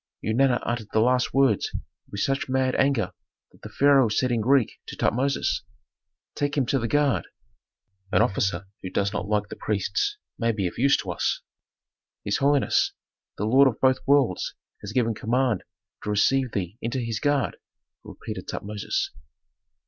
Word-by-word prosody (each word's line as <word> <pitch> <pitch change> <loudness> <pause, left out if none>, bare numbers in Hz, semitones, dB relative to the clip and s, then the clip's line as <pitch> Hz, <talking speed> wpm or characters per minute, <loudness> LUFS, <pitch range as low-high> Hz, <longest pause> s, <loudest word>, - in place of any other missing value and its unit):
Eunana 120 +3 +2
uttered 120 -3 -2
the 110 - +2
last 125 +2 +2
words 135 -6 +2 0.4
with 100 - -4
such 135 -1 0
mad 130 0 +1
anger 135 -5 +1 0.4
that - - -23
the - - -8
pharaoh 140 -4 +4
said 125 +4 +1
in 115 -2 +1
Greek 130 0 +2
to - - -7
Tutmosis, 135 -2 0 0.7
"Take 145 0 -2
him 135 - +2
to 135 +3 +1
the 115 - -1
guard. 140 -8 +1 0.8
An 105 +2 +4
officer 95 -4 0 0.2
who 95 - -5
does 100 +2 0
not 100 - -3
like 105 -1 0
the - - -6
priests 405 - -1 0.2
may 115 -1 +2
be 100 -3 -2
of 90 - -4
use 135 +2 +4
to - - -4
us." - - -1 0.8
"His 100 - +1
holiness, 140 0 +2 0.4
the 105 - -1
lord 135 +5 +6
of 120 - -1
both 130 -1 +3
worlds 135 -10 +2 0.3
has 105 - -6
given 115 -1 +1
command 120 -1 0 0.4
to - - -4
receive 125 +5 +2
thee 100 +2 -4
into 120 +3 -2
his 115 -3 -2
guard," 145 -3 0 0.5
repeated - - -8
Tutmosis. 105 - -3
120 Hz, 165 wpm, -25 LUFS, 105-135 Hz, 0.8 s, lord